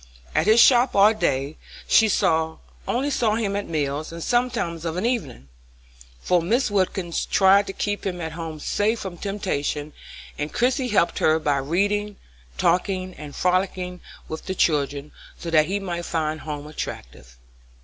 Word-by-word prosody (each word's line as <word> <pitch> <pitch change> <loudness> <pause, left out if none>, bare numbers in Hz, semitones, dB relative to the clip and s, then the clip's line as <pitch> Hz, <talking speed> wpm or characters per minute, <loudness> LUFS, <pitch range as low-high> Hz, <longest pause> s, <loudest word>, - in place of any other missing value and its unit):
At - - +1
his 220 +2 +6
shop 245 +1 +6
all 205 +2 +6
day, 140 -8 -1 0.3
she 220 -1 +5 0.8
only 275 +4 0
saw 225 -6 +1
him 210 -3 -1
at 205 - -3
meals 150 -1 -2
and 165 0 -6
sometimes 240 -10 0
of 165 0 -3
an 185 - -1
evening, 225 - -2 0.7
for 180 - +2
Mrs. 225 +7 +1
Wilkins 185 -3 0
tried 195 +1 +4
to 195 - -5
keep 205 0 -2
him 180 -2 -3
at 160 -1 -4
home 160 -1 -6
safe 215 +8 0
from 180 -3 -7
temptation, 155 -7 -3 0.5
and 150 +1 -3
Christie 255 +2 +1
helped 205 -7 +1
her 155 0 +4
by 145 -3 0
reading, 205 +8 0 0.4
talking, 185 - 0
and 150 -3 -10
frolicking 180 0 -1 0.3
with 160 - -7
the 190 - -2
children, 145 -3 0 0.3
so 170 - -6
that 155 -1 +4
he 200 +3 -1
might 175 -3 -4
find 155 -1 -2
home 150 -2 -6
attractive. 65 - -8
180 Hz, 160 wpm, -23 LUFS, 155-205 Hz, 0.8 s, his